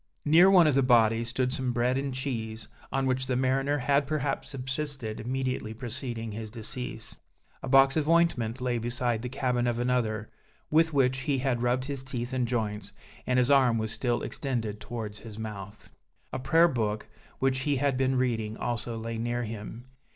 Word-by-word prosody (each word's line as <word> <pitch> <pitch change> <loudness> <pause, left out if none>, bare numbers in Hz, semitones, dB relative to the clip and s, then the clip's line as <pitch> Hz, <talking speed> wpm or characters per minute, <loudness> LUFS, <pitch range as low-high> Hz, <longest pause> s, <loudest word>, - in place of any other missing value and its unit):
Near 170 +5 +7
one 185 -3 +7
of 150 - +4
the 135 - +4
bodies 115 -2 +4
stood 125 +1 0
some 130 -2 -1
bread 120 +2 +1
and 135 0 -1
cheese, 115 -5 -4 0.2
on 135 0 0
which 130 0 0
the 125 - 0
mariner 135 +3 +1
had 140 +1 +2
perhaps 150 -2 -2
subsisted 135 -3 -4
immediately 125 -2 -2
preceding 120 -1 -5
his 110 +1 -6
decease; 115 +1 -6 0.4
a - - -5
box 135 0 +6
of 155 -1 0
ointment 130 -9 +2
lay 125 -2 0
beside 120 -1 -1
the 125 - -4
cabin 125 -1 0
of 120 -1 0
another, 120 -3 0 0.4
with 165 +1 +4
which 130 -2 +2
he 140 +1 0
had 125 -2 0
rubbed 125 +1 +1
his 140 -2 -4
teeth 125 -1 -4
and 125 -2 0
joints, 110 -3 -2 0.4
and 125 - +2
his 125 +2 +3
arm 130 -4 +5
was 110 -1 -1
still 120 0 0
extended 115 -6 -3
towards 110 -3 -6
his 110 -2 -10
mouth. 105 -2 -8 0.4
A - - -2
prayer 165 +6 +5
book, 110 -7 -2 0.3
which 135 0 +1
he 145 +1 0
had 135 0 +1
been 130 0 +1
reading, 115 -4 0
also 120 -1 -3
lay 115 0 -4
near 120 +1 -1
him. 110 +2 -7
125 Hz, 180 wpm, -28 LUFS, 115-135 Hz, 0.4 s, Near